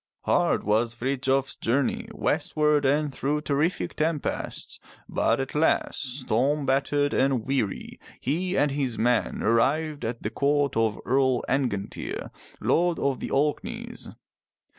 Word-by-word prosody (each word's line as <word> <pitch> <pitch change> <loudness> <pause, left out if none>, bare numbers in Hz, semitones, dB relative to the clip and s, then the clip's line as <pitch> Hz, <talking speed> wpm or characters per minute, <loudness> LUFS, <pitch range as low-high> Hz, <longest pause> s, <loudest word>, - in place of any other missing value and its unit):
Hard - - +2
was 115 +3 +1
Frithjof's 135 +1 0
journey 130 +4 0
westward 150 -1 +1
and 145 +1 +2
through 145 +3 -1
terrific 150 +4 0
tempests, 155 -1 -2 0.3
but - - +1
at 135 - -3
last, 145 -3 0
storm 135 +5 +1
battered 145 +2 +1
and 130 -4 +1
weary, 130 -8 -2 0.2
he 180 +8 -1
and 145 -1 +3
his 135 -5 -2
men 120 0 +1
arrived 145 +7 +1
at 115 +1 -4
the - - -2
court 145 0 +1
of 110 -2 +1
Earl 130 -1 +2
Angantyr, 120 -8 -2 0.3
Lord 175 0 +2
of 140 -2 0
the - - -4
Orkneys. 230 +12 -2
140 Hz, 125 wpm, -26 LUFS, 125-150 Hz, 0.3 s, and